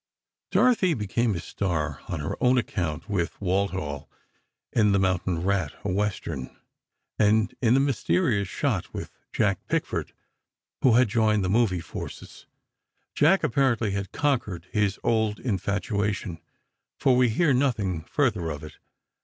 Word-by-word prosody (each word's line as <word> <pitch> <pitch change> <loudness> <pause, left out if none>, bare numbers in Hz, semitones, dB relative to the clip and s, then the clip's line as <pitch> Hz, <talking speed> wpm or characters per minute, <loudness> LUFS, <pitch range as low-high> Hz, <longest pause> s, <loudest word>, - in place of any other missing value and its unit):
Dorothy 205 -9 +3
became 110 0 0
a - - -3
star 80 -6 -2
on 85 -4 -3
her 75 - -3
own 125 +1 +4
account, 85 -7 -2
with 95 -5 -2
Walthall 95 -7 -2 0.6
in 105 -3 +4
"The 100 - +3
Mountain 90 -2 0
Rat," 95 -5 0
a 100 - 0
Western; 95 -9 -3 0.6
and 110 0 +3
in 120 -1 +4
"The - - +4
Mysterious 100 -6 +1
Shot," - - -2
with - - -5 0.2
Jack - - +1
Pickford, - - -2 0.7
who 130 - +5
had 125 +1 +5
joined 110 -2 +2
the 90 - 0
movie 105 -6 +2
forces. 80 - -9 0.7
Jack, 170 +7 +4
apparently, 120 -4 +2
had 100 -1 -3
conquered 115 - -1
his 105 -2 +1
old 110 -2 +1
infatuation, 100 -3 -2 0.6
for 130 - +3
we 125 -1 +4
hear 140 +6 +2
nothing 110 - 0
further 105 - 0
of 75 0 -5
it. 75 - -11
100 Hz, 135 wpm, -26 LUFS, 90-120 Hz, 0.7 s, who